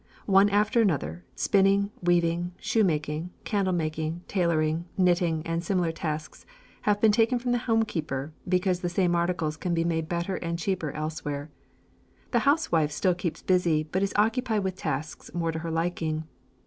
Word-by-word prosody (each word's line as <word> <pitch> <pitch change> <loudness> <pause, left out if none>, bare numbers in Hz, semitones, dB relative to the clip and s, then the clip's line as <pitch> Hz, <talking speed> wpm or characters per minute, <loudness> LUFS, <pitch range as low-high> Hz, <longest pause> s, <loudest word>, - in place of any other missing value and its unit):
One 195 0 +5
after 210 +3 +3
another, 90 - -1
spinning, 200 +1 +3
weaving, 175 0 +1
shoemaking, 160 -5 0
candlemaking, 170 -5 -1
tailoring, 165 -3 +1
knitting, 175 -3 +2
and 165 +1 -2
similar 175 -2 +1
tasks 155 -1 -5 0.4
have 205 -1 +2
been 220 0 +5
taken 225 +4 +3
from 245 0 -2
the 245 - +2
homekeeper 170 - -1 0.2
because 180 0 +2
the 175 - -2
same 175 0 +1
articles 170 -3 0
can 175 0 -1
be 165 - +1
made 160 -1 -1
better 175 +2 -1
and 170 0 -3
cheaper 170 -2 -1
elsewhere. 150 -1 -4 0.8
The - - +3
housewife 170 - +2
still 180 +5 +2
keeps 175 -2 -4
busy, 175 -4 +2
but 175 +5 -2
is 200 0 +1
occupied 220 0 +1
with 190 -1 -2
tasks 155 -5 -4
more 165 -1 0
to 160 - -4
her 165 +1 -4
liking. 165 -1 -1
175 Hz, 155 wpm, -27 LUFS, 160-195 Hz, 0.8 s, One